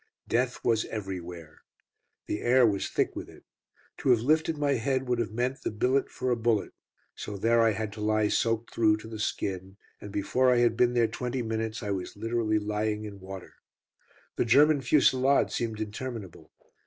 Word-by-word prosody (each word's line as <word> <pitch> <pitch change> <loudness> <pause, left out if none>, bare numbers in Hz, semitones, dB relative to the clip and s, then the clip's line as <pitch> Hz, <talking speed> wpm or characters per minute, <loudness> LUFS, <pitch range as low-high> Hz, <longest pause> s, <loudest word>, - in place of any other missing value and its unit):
Death 125 +1 -1
was 115 -2 +2
everywhere. 90 -6 -7 0.6
The 105 - -3
air 125 +1 +4
was 100 -3 0
thick - - 0
with - - -6
it. - - -16 0.6
To - - -1
have 120 -3 +5
lifted 155 +4 +1
my 145 -1 +1
head 130 +1 -1
would 125 -1 0
have 115 - -1
meant 125 +4 -2
the - - -2
billet 125 +6 +1
for 130 - -2
a - - +3
bullet. 115 -2 0 0.4
So 105 - -6
there 115 +3 +3
I 115 -1 +4
had 110 0 -4
to 105 - -8
lie 110 0 +2
soaked 115 +1 0
through 110 -2 +3
to 110 - -11
the 110 -1 -8
skin, 95 -2 -3 0.2
and 105 - -9
before 125 +6 +2
I 125 - +3
had 120 -1 +3
been 120 +1 +2
there 120 -1 +4
twenty 125 +3 -3
minutes 110 +1 -3
I 105 - -2
was 95 0 -4
literally 115 0 0
lying 105 0 -2
in 100 -2 -9
water. 95 -1 -9 0.8
The - - +1
German 145 +5 +5
fusillade 130 +1 +3
seemed 110 -2 -3
interminable. 110 -2 -6
115 Hz, 185 wpm, -28 LUFS, 105-125 Hz, 0.8 s, have